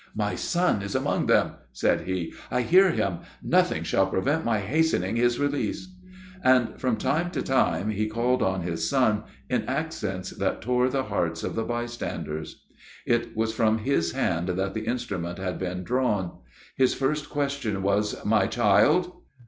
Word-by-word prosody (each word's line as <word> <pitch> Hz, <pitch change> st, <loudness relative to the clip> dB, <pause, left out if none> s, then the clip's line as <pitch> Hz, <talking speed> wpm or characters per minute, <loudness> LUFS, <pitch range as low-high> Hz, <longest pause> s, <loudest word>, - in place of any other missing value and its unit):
"My 105 Hz, -1 st, -1 dB
son 175 Hz, -, +1 dB
is 100 Hz, 0 st, -5 dB
among -, -, 0 dB
them," -, -, +3 dB, 0.2 s
said 65 Hz, -, +1 dB
he, 95 Hz, -3 st, -2 dB, 0.2 s
"I 125 Hz, 0 st, +1 dB
hear 185 Hz, +7 st, +6 dB
him; 95 Hz, -, -1 dB, 0.2 s
nothing -, -, +2 dB
shall 95 Hz, 0 st, +2 dB
prevent 140 Hz, +12 st, 0 dB
my 115 Hz, -2 st, +1 dB
hastening 110 Hz, -, +1 dB
his 120 Hz, 0 st, +2 dB
release;" 145 Hz, +5 st, -1 dB, 0.5 s
and, 130 Hz, -2 st, +3 dB
from 125 Hz, -4 st, +1 dB
time 170 Hz, +4 st, 0 dB
to -, -, -3 dB
time, 105 Hz, -7 st, +1 dB
he 110 Hz, +1 st, -1 dB
called 120 Hz, +3 st, +1 dB
on 95 Hz, -1 st, +1 dB
his 80 Hz, -2 st, -2 dB
son, 110 Hz, -6 st, +2 dB, 0.2 s
in -, -, 0 dB
accents -, -, -3 dB
that -, -, -2 dB
tore 125 Hz, +2 st, +1 dB
the 135 Hz, 0 st, 0 dB
hearts 85 Hz, -9 st, -2 dB
of -, -, -2 dB
the 115 Hz, -, -1 dB
bystanders. 120 Hz, -10 st, -5 dB, 0.4 s
It 120 Hz, -1 st, 0 dB
was 110 Hz, 0 st, 0 dB
from 110 Hz, -1 st, +2 dB
his 105 Hz, -8 st, 0 dB
hand 85 Hz, 0 st, 0 dB
that 95 Hz, +2 st, -1 dB
the 110 Hz, +1 st, -4 dB
instrument 100 Hz, -8 st, -3 dB
had 95 Hz, -1 st, -4 dB
been 90 Hz, 0 st, -3 dB
drawn. 115 Hz, -6 st, -1 dB, 0.4 s
His 130 Hz, -1 st, +3 dB
first 150 Hz, +2 st, -1 dB
question 140 Hz, -9 st, -2 dB
was 100 Hz, +2 st, 0 dB
"my 105 Hz, -2 st, +3 dB
child?" 120 Hz, -, +3 dB
110 Hz, 165 wpm, -26 LUFS, 95-130 Hz, 0.5 s, hear